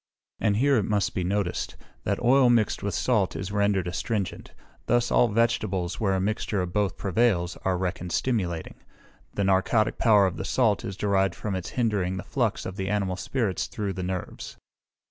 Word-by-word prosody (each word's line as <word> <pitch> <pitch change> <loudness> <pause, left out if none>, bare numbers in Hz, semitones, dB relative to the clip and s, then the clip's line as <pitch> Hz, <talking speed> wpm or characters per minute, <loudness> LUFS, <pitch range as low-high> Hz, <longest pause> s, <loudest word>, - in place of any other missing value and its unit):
And 105 -2 +1
here 140 +3 +3
it 105 - +1
must 105 -2 +1
be 90 - -1
noticed, 100 0 -2 0.3
that 100 +1 0
oil 125 +1 +5
mixed 115 -3 +2
with 100 -3 -2
salt 110 -7 +1
is 95 +1 -4
rendered 100 -3 +1
astringent: 100 +3 -3 0.4
thus 120 0 +2
all 120 - +5
vegetables, 105 -5 0
where 95 -3 +1
a - - 0
mixture 105 +1 -1
of 90 -1 -3
both 100 -3 0
prevails, 95 -3 +1
are 95 -1 -1
reckoned 90 -1 -3
stimulating. 90 -11 -2 0.6
The 100 - 0
narcotic 95 +3 +2
power 105 -3 +5
of 95 - -2
the - - -4
salt 105 0 +1
is 95 - -5
derived 95 -3 +1
from 105 - -4
its 95 -1 -4
hindering 100 -6 0
the 90 - -5
flux 120 -1 -1
of 95 - -6
the 95 0 -2
animal 100 -2 0
spirits 105 -1 -2
through 100 -3 -3
the 95 - -5
nerves. 90 0 -5
100 Hz, 185 wpm, -26 LUFS, 95-110 Hz, 0.6 s, oil